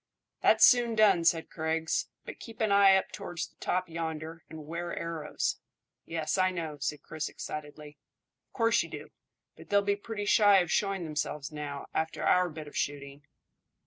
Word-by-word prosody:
"That's - - +6
soon 240 -2 +4
done," 200 -6 +4
said 165 -1 +3
Griggs; 160 0 -1 0.2
"but - - -8
keep 225 -1 -11
an 220 -2 +1
eye 200 -1 +7
up 190 - 0
towards 170 -2 -5
the - - -32
top 185 0 -1
yonder, 160 -1 -5
and 155 -2 -9
'ware 170 +2 -4
arrows." 165 -3 -3 0.5
"Yes, 165 +3 -2
I 185 0 +4
know," 160 -5 -5
said 145 +1 -3
Chris 155 - -4
excitedly. 150 -1 -8 0.5
"Of - - -52
course 230 -1 +3
you - - -6
do; - - -8 0.5
but - - -15
they'll 200 0 +3
be 200 0 +1
pretty 205 0 -5
shy 205 -1 +6
of 175 -3 +1
showing 195 -3 0
themselves 150 -2 -3
now, 145 -2 -6
after 160 0 -2
our 180 0 +3
bit 155 -1 -8
of - - -12
shooting." 140 0 -4
165 Hz, 175 wpm, -29 LUFS, 150-195 Hz, 0.5 s, eye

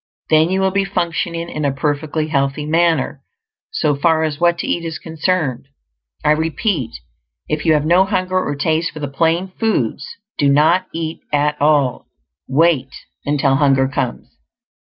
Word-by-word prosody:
Then 155 +1 +5
you 190 +1 0
will 190 0 +2
be 200 +1 +1
functioning 170 -2 -2
in 150 -2 -4
a 140 - +1
perfectly 150 +3 -2
healthy 140 0 0
manner, 165 +1 +1 0.5
so 440 - 0
far 160 +2 +2
as 155 -2 -2
what 170 0 +3
to - - -4
eat 170 - -1
is 165 -1 -4
concerned. 160 -5 -2 0.6
I 150 - +5
repeat, 160 - 0 0.6
if 155 -1 -2
you 160 - +6
have 150 -1 +1
no 175 +4 +4
hunger 185 -2 0
or 145 - -3
taste 160 +2 0
for 155 - -8
the 145 - -3
plain 165 +6 0
foods, 145 - 0 0.3
do 145 -2 +3
not 160 +6 +3
eat 165 0 -4
at 150 0 +1
all; 145 -4 +2 0.4
wait 140 -2 +2 0.4
until 140 -2 +2
hunger 135 -2 +3
comes. 100 - -4
155 Hz, 160 wpm, -18 LUFS, 145-170 Hz, 0.6 s, you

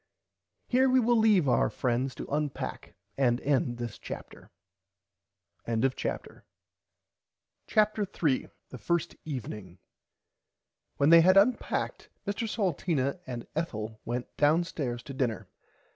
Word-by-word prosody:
Here 260 +1 +3
we 260 0 +5
will 240 0 +3
leave 210 -8 +4
our 125 - +3
friends 125 +1 -1
to - - -6
unpack 145 -1 -4 0.2
and 120 -3 +3
end 130 -4 +1
this 120 -2 -6
Chapter. - - -9 1.2
[Pg 115 -1 0
36] 135 -1 -2 1.3
CHAPTER 215 -1 +2
3 150 -8 0 0.2
THE 125 - -9
FIRST 170 +3 -1
EVENING 105 - -6 1.2
When 140 +3 +4
they 165 0 +9
had 185 +3 +5
unpacked 220 +6 +1 0.2
Mr 220 +2 -2
Salteena 170 - 0
and 120 -2 -5
Ethel 110 -9 -4
went 120 +1 -4
downstairs 145 -5 +1
to 140 - -8
dinner. 125 -6 -2
140 Hz, 115 wpm, -29 LUFS, 120-185 Hz, 1.3 s, they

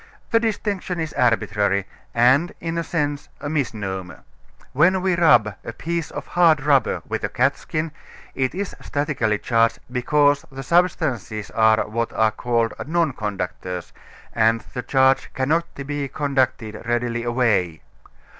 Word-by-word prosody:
The 230 - +5
distinction 205 -5 -2
is 160 -1 -3
arbitrary 105 -4 +1 0.3
and 130 +8 +4
in 165 0 -3
a - - -1
sense 145 -3 -2
a - - -5
misnomer. 100 - -3 0.5
When 175 +7 +4
we 185 -2 +2
rub 120 -11 +4
a 115 - -6
piece 165 +5 -3
of - - -6
hard 165 -5 +3
rubber 140 -2 +2
with - - -3
a - - 0
catskin 155 0 -1 0.4
it 130 +2 -1
is 200 +1 -4
statically 145 -8 -1
charged 115 +1 +2
because 145 +3 +2
the 135 0 -7
substances 140 - 0
are 110 -1 +3
what 115 +2 -2
are 110 -1 +3
called 115 -1 0
non 165 -3 +1
conductors, 90 -4 -5 0.4
and 115 0 +3
the 125 - -3
charge 130 +2 +2
cannot 155 +6 +1 0.2
be 145 0 -3
conducted 130 -6 -1
readily 120 0 0
away. 115 -9 0
130 Hz, 135 wpm, -22 LUFS, 110-155 Hz, 0.5 s, The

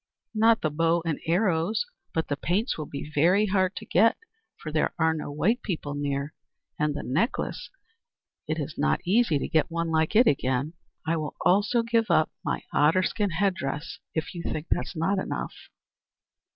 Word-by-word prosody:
"Not 225 +1 +4
the 155 - 0
bow 165 +2 +1
and 160 -3 -1
arrows, 180 - +1 0.3
but 160 - -1
the 145 - -1
paints 190 - 0
will 155 -2 -5
be 145 +2 -7
very 180 +8 +4
hard 190 -2 +1
to 220 - -7
get, 225 +1 +4 0.4
for 155 - -7
there 155 0 0
are 160 -1 +3
no 150 -2 -5
white 210 - +1
people 155 -7 -3
near; 145 +1 -2 0.5
and 150 -1 +1
the - - -4
necklace 155 - -1 0.8
it 155 - -1
is 150 +1 -5
not 75 0 +1
easy 195 -4 +3
to - - -3
get 160 +1 +2
one 170 0 -2
like 160 +4 +1
it 240 +4 +7
again. 135 - +1 0.3
I 165 +1 +1
will 155 -2 -4
also 205 +5 +3
give 230 -2 +1
up 155 -2 +3
my - - -2
otter 160 +6 +4
skin 205 +2 0
head 190 +3 +1
dress, 150 +5 -5 0.2
if 160 - -2
you 170 - -5
think 155 -1 -4
that - - +2
it 180 - -8
not 190 +5 +1
enough." - - -4
165 Hz, 185 wpm, -27 LUFS, 150-200 Hz, 0.8 s, it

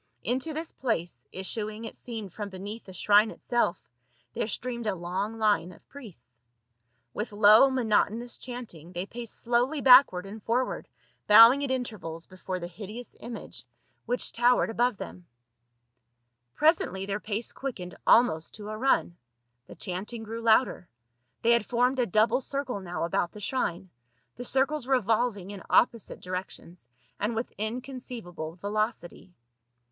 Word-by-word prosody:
Into 260 +6 0
this 320 +2 -4
place, 170 - -3
issuing 210 +3 -3
it - - -8
seemed 220 -7 -7
from 205 -2 -5
beneath 200 +4 -8
the 190 - -11
shrine 205 +4 +4
itself, 240 -7 -1 0.5
there - - -2
streamed 235 +1 -4
a 205 - 0
long 190 +5 -3
line 210 -5 +2
of 175 - -18
priests. 160 - -13 0.7
With 210 +2 -4
low 210 +5 +7
monotonous 235 -1 0
chant 245 -3 -7
ing 165 +2 -13
they 175 +1 -3
paced 235 +1 -7
slowly 245 +5 +1
backward 250 -8 +7
and 210 +3 -9
forward, 245 +5 -1 0.4
bowing 230 +6 +9
at 280 - -1
intervals 215 -11 -4
before 185 0 -6
the 175 - -5
hideous 210 +7 -9
image 235 0 -7 0.4
which 245 0 -1
towered 245 0 +3
92 225 - -7
PAUL. 240 +1 +5
above 245 -5 -6
them. 180 -2 -9 1.3
Presently 295 - +2
their 200 +1 -2
pace 215 +2 -3
quickened 195 -10 -6
almost 220 -10 +4
to 210 0 -8
a 215 - -5
run; 255 -8 +2 0.5
the - - -11
chanting 205 +5 -5
grew 225 +1 -6
louder; 225 -5 +3 0.5
they 230 - +4
had 235 -2 +3
formed 250 +4 +1
a 245 - +2
double 220 +6 +3
circle 270 -5 -3
now 175 -4 -4
about 170 +1 -1
the 210 - -9
shrine, 190 -6 -2 0.4
the 245 - -7
circles 270 +1 +1
revolving 225 -5 +1
in 200 -2 -8
opposite 230 -2 +2
directions, 180 -5 -7 0.3
and 215 +3 -1
with 225 +2 -3
inconceivable 220 -8 -5
velocity. 205 -2 -3
220 Hz, 150 wpm, -28 LUFS, 190-245 Hz, 1.3 s, bowing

